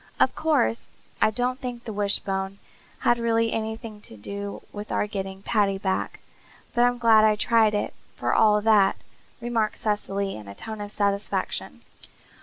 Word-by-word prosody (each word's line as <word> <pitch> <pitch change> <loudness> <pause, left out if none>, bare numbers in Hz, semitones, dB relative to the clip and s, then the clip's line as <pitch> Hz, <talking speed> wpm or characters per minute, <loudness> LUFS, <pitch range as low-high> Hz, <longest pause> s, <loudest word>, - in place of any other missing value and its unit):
"Of - - +4
course 295 - +1 0.3
I 215 - +6
don't 250 +3 -1
think 245 -2 -5
the 220 - -6
wishbone 195 -1 -1 0.4
had 240 - +3
really 230 -1 +2
anything 220 -1 -4
to 110 - -12
do 200 - -6
with 205 +1 -7
our - - +1
getting 195 -2 -5
Paddy 205 -4 +2
back, 190 -1 -2 0.5
but 240 - +3
I'm 245 0 +2
glad 225 -2 +6
I 215 -1 +5
tried 220 0 +3
it, 205 - -1 0.2
for - - 0
all 210 -1 +5
that," 205 -3 +4 0.4
remarked 230 -3 0
Cecily 200 -2 -1
in 105 -2 -9
a 100 - -9
tone 220 - -7
of 205 0 -6
satisfaction. 200 -1 -2
210 Hz, 160 wpm, -25 LUFS, 200-230 Hz, 0.5 s, I